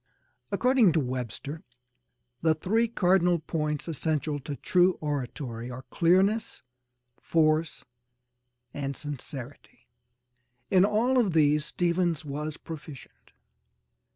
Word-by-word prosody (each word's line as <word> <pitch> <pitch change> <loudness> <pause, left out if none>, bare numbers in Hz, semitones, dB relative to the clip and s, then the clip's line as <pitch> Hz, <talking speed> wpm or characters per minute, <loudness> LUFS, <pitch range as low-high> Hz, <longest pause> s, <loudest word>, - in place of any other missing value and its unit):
According 250 - +4
to 160 - +3
Webster, 130 +3 -4 0.8
the 160 -1 +3
three 220 +9 +1
cardinal 180 -5 +3
points 150 -1 -3
essential 155 -2 -1
to 145 +1 -6
true 180 +3 +3
oratory 125 -5 -4
are 125 +1 -7
clearness, 190 - +2 0.6
force 155 0 +1 0.9
and 140 -1 -4
sincerity. 145 -2 -9 0.8
In 190 0 +6
all 235 +5 +2
of 205 -8 +1
these 150 -1 +3
Stephens 170 -2 0
was 150 +2 -4
proficient. 155 -4 -11
155 Hz, 95 wpm, -28 LUFS, 145-180 Hz, 0.9 s, In